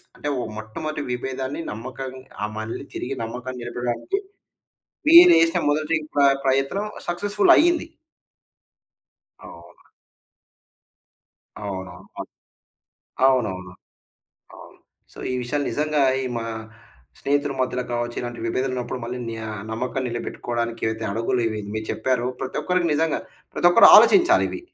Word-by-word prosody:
అంటే - - -6 0.3
మొట్టమొదటి 150 +8 -5
వీభేదాన్ని 130 +4 -3
నమ్మకం 130 +4 -6 0.3
ఆ 105 - 0
మళ్ళి 110 +1 -5
తిరిగి 135 +2 -4
నమ్మకం 125 +3 -6
నిలపడానికి 120 - -3 0.9
మీరు 345 +2 +10
వేసిన 165 0 +3
మొదటి 155 +2 +1 0.2
ప్ర 145 - +2 0.2
ప్రయత్నం 135 +10 +1 0.2
సక్సెస్‌ఫుల్ 205 +4 +2
అయింది. 340 0 +3 1.6
అవును. 85 +1 -15 1.7
అవునువును. 95 -3 -6 1.3
అవునవును. 95 -9 0 0.8
అవును. - - -14 0.3
సో, - - -14
ఈ - - -1
విషయాలు 145 +4 -1
నిజంగా 150 -1 0 0.2
ఈ - - -3
మా 115 - -4 0.8
స్నేహితుల 145 0 0
మధ్యలో 125 -1 -1
కావచ్చు. 120 0 -2
ఇలాంటి 120 -1 -6
విభేదాలు 130 +3 -1
ఉన్నప్పుడు 125 0 -4
మళ్ళీ 125 +2 -5
న్యా 110 -1 -6 0.2
నమ్మకం 125 +4 -3
నిలబెట్టుకోవడానికి 120 0 -4
ఏవైతే 110 0 -3
అడుగులు 115 +2 0
ఇవి 110 -1 -4
మీరు 110 0 -4
చెప్పారో, 125 +1 0
ప్రతి 130 - -4
ఒక్కరికి 180 -1 +1
నిజంగా, 160 +1 +1 0.4
ప్రతి 175 - +4
ఒక్కరు 230 - +8
ఆలోచించాలివి. 350 -2 +5
130 Hz, 115 wpm, -23 LUFS, 115-150 Hz, 1.7 s, మీరు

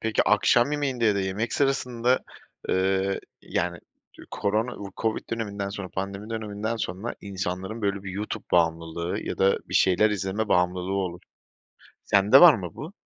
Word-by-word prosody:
Peki 110 -1 +1
akşam 120 +5 +3
yemeğinde 135 -5 -1
ya 105 -2 +4
da 100 - 0
yemek 95 +5 -2
sırasında, 125 -3 +1 0.5
ııı, 95 +1 +1 0.2
yani 85 0 -2 0.5
korona, 110 +4 -1 0.2
Covid 110 -1 -2
döneminden 100 -3 -3
sonra, 100 -1 -6
pandemi 100 +3 -5
döneminden 110 0 -3
sonra 110 +1 -4
insanların 95 +2 -4
böyle 100 -1 -1
bir 95 - -6
YouTube 105 +3 -5
bağımlılığı 85 0 0
ya - - -5
da 95 0 +3
bir - - -6
şeyler 95 +3 +4
izleme 105 +1 -2
bağımlılığı 90 +1 +1
olur. 90 -2 -3 0.8
Sende 100 +7 +6
var 175 -4 +10
mı 90 -6 -5
bu? 155 +6 -8
100 Hz, 145 wpm, -26 LUFS, 95-115 Hz, 0.8 s, var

